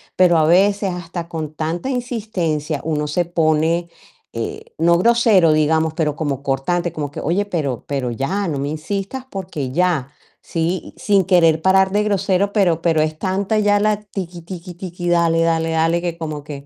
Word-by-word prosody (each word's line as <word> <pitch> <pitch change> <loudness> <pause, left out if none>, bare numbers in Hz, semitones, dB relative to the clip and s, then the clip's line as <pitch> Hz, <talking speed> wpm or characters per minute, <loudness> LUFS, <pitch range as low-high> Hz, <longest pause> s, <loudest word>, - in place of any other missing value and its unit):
pero 175 -2 +5
a 155 - +4
veces 195 +3 +3
hasta 170 -1 -6
con 155 -3 -5
tanta 165 - -3
insistencia 200 - -2
uno 150 -2 -1
se 175 +3 0
pone, 165 0 +1 0.4
eh, 115 0 -5
no 170 +1 +4
grosero 220 -6 +4
digamos, 160 +1 +2
pero 150 -3 0
como 140 -3 -3
cortante, 165 +6 -1
como 145 -3 -3
que: - - -7
"Oye, 185 +7 0
pero 145 - -3
pero 135 -4 -2
ya 185 - -2
no 145 -4 -2
me 140 - -2
insistas, 195 - -4
porque 175 - -5
ya". 160 -4 0 0.3
Sí, 170 +2 -2
sin 205 -6 +2
querer 165 -4 +4
parar 190 +1 +4
de 205 - +2
grosero, 200 -1 +1
pero 175 -6 +2
pero 160 -2 +2
es 155 0 -2
tanta 195 +3 0
ya 205 0 +3
la 210 0 +2
tiki, 185 -4 -7
tiki, 180 0 -8
tiki, 175 -1 -6
dale, 165 -1 +3
dale, 165 0 +1
dale, 165 +1 +1
que 170 -1 -3
como 155 -3 -5
que 145 -2 -8
170 Hz, 175 wpm, -19 LUFS, 155-190 Hz, 0.4 s, pero